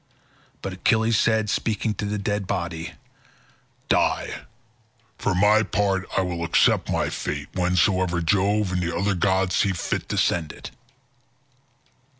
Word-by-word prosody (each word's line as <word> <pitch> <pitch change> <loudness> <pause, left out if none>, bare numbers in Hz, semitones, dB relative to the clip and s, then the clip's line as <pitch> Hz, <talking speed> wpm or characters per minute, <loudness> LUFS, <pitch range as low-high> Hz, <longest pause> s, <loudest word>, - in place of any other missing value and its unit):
But 95 - -4
Achilles 110 +3 +2
said, 110 -1 +2
speaking 110 +1 -1
to 105 - -4
the 105 +1 -2
dead 100 -1 -2
body, 80 -2 -3 0.9
"Die; - - +1 0.9
for 100 - 0
my 105 +3 +5
part 100 -3 -1
I - - +4
will 85 -2 -3
accept 85 - +2
my - - 0
fate - - -4
whensoever 90 -1 +1
Jove 100 +3 +1
and 90 0 -1
the 85 -1 -2
other 100 +3 +1
gods 95 0 +1
see 100 - +2
fit 85 - -3
to - - -2
send 80 -3 0
it." - - -10
95 Hz, 140 wpm, -24 LUFS, 90-105 Hz, 0.9 s, my